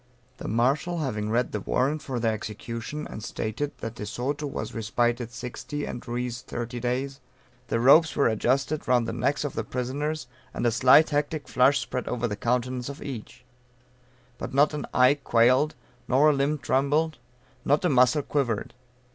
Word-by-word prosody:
The - - -7
Marshal 140 +9 +1
having 110 -9 -2
read 120 +2 +1
the 105 - -2
warrant 135 +9 0
for 130 -3 -4
their 115 -1 +1
execution, 115 +7 -5
and 105 - -8
stated 115 +7 -4
that 115 - -4
de 105 -3 -7
Soto 140 +7 -3
was 140 - -5
respited 120 +1 0
sixty 130 +4 -5
and 120 - -5
Ruiz 120 0 -3
thirty 120 +1 -5
days, 130 +3 -2 0.5
the 115 - 0
ropes 140 +5 +6
were 140 - +3
adjusted 135 +7 0
round 125 -2 +3
the - - -3
necks 130 +5 0
of 145 - -3
the 110 - -2
prisoners, 135 +6 -3 0.3
and - - -2
a 120 - +4
slight 130 +7 +6
hectic 145 +1 -1
flush 135 +3 +4
spread 130 -2 -3
over 120 0 -1
the 105 - -3
countenance 125 +3 -1
of 140 - -8
each; 125 -1 -8 0.9
but - - -5
not 145 +2 +4
an 150 - -4
eye 130 +3 +4
quailed, 125 +7 +3 0.3
nor 145 +4 +5
a - - +1
limb 140 +2 +1
trembled, 145 +3 +1 0.4
not 150 +5 +2
a - - +4
muscle 130 +2 +4
quivered. 125 -8 -1
125 Hz, 170 wpm, -26 LUFS, 120-145 Hz, 0.9 s, ropes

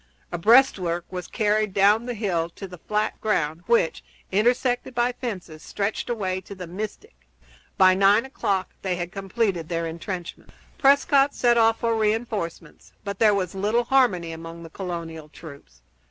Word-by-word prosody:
A 175 - -2
breastwork 185 -6 +4
was 180 -1 -5
carried 215 -2 0
down 205 +4 +4
the 245 - -3
hill 180 -6 -1
to 195 - -7
the 180 -2 -11
flat 210 +3 -2
ground 165 -7 0
which, 235 -8 +2 0.3
intersected 245 +4 +1
by 240 +1 +2
fences, 195 -11 -6
stretched 200 +7 -3
away 190 -5 -2
to 200 +2 -10
the 185 -1 -7
Mystic. 195 - -7 0.6
By 185 0 +6
nine 200 +5 +4
o'clock 200 -8 -2
they 185 -2 -1
had 175 0 -5
completed 195 -4 -2
their 165 -1 -1
intrenchments. 170 +2 -7 0.2
Prescott 280 0 +4
sent 240 -1 +3
off 225 0 +3
for 230 -1 +1
re 215 -1 +2
enforcements, 190 -8 -6
but 200 -1 -5
there 215 -2 +5
was 185 -3 -2
little 210 +5 +1
harmony 235 -10 +2
among 165 +1 -9
the 165 - -11
colonial 165 -4 -6
troops. 140 - -13
195 Hz, 160 wpm, -24 LUFS, 170-225 Hz, 0.6 s, By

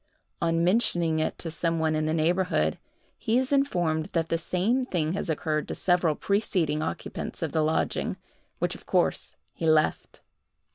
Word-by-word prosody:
On 165 0 +2
mentioning 175 -5 +2
it 155 - -1
to 165 - -6
some 165 +1 0
one 160 -1 +1
in 155 0 0
the 155 - 0
neighborhood, 175 +4 +1 0.4
he 230 +1 +1
is 260 +1 0
informed 175 - +1
that 165 -1 0
the 165 - +1
same 200 +10 0
thing 170 -9 -1
has 190 - -2
occurred 155 -1 -1
to - - -4
several 175 -4 +2
preceding 180 -7 0
occupants 85 - -4
of - - -2
the 160 - +1
lodging, 155 +1 0 0.4
which, - - 0
of - - -12
course, - - 0 0.2
he 165 - -3
left. 155 -1 +1
165 Hz, 165 wpm, -27 LUFS, 155-185 Hz, 0.4 s, On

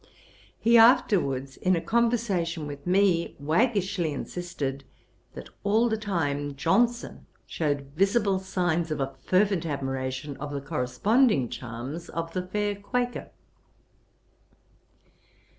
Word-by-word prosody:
He 235 0 +5
afterwards, 175 - +3
in 185 0 +2
a - - 0
conversation 205 -8 0
with 145 +2 -8
me, 185 -2 +2
waggishly 185 - +1
insisted, 145 -3 -4 0.5
that - - -9
all 220 +4 +3
the 220 - +1
time 145 -9 -2
Johnson 235 - 0 0.2
shewed 145 -3 -2
visible 195 +1 +2
signs 175 -3 -1
of 155 - -2
a 135 0 -2
fervent 190 -2 +2
admiration 135 -2 -3
of 145 +1 -6
the 140 - -2
corresponding 145 - +1
charms 125 +6 -7
of 165 0 -4
the 185 - -1
fair 205 +2 -1
Quaker. 245 +4 -3
170 Hz, 110 wpm, -27 LUFS, 140-205 Hz, 0.5 s, He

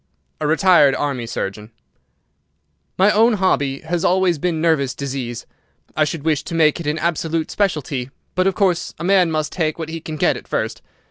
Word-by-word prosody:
"A 150 - -1
retired 160 -4 +5
Army 135 -5 -2
surgeon." 105 -1 -5 1.3
"My 195 +3 +5
own 225 +3 +4
hobby 145 -9 0
has 170 +2 -2
always 180 -3 +2
been 170 0 -1
nervous 145 -6 +1
disease. 130 -4 -5 0.5
I 155 - +3
should 150 0 -4
wish 155 -2 +1
to 170 - -5
make 155 0 +3
it 165 - -5
an 150 +1 0
absolute 165 -1 -1
specialty, 145 -10 -1 0.2
but, 185 +1 +1
of 195 - +1
course, 185 -4 0
a 155 - -7
man 185 -1 +4
must 155 -2 -1
take 155 -4 -1
what 160 -1 -5
he 165 0 -5
can 155 0 -6
get - - +2
at - - -12
first. - - -2
160 Hz, 185 wpm, -20 LUFS, 140-180 Hz, 1.3 s, retired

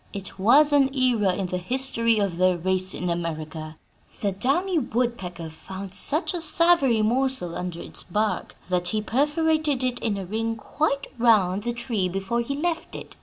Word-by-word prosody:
It 195 -1 -7
was 285 +9 +5
an 275 -2 +4
era 235 -8 +2
in 195 - -2
the 180 0 -3
history 230 +1 +1
of 200 -5 -1
their 185 0 +3
race 185 +2 +1
in 180 - -3
America. 160 -2 -4 0.4
The 200 - +1
downy 305 - 0
woodpecker 220 - -3
found 190 +4 -9
such 300 - +2
a 350 - -3
savory 310 -8 +3
morsel 245 -6 0
under 180 -2 -5
its - - -3
bark 210 +4 -2
that 180 -1 0
he 215 +4 0
perforated 295 +2 +1
it 250 -1 -1
in 215 -3 -1
a 195 - -5
ring 225 +4 -2
quite 280 +5 -1
round 205 -5 +4
the 240 +3 -2
tree 235 -6 -2
before 195 +6 -1
he 275 +4 -3
left 330 +3 -2
it. - - -7
220 Hz, 170 wpm, -25 LUFS, 185-270 Hz, 0.4 s, was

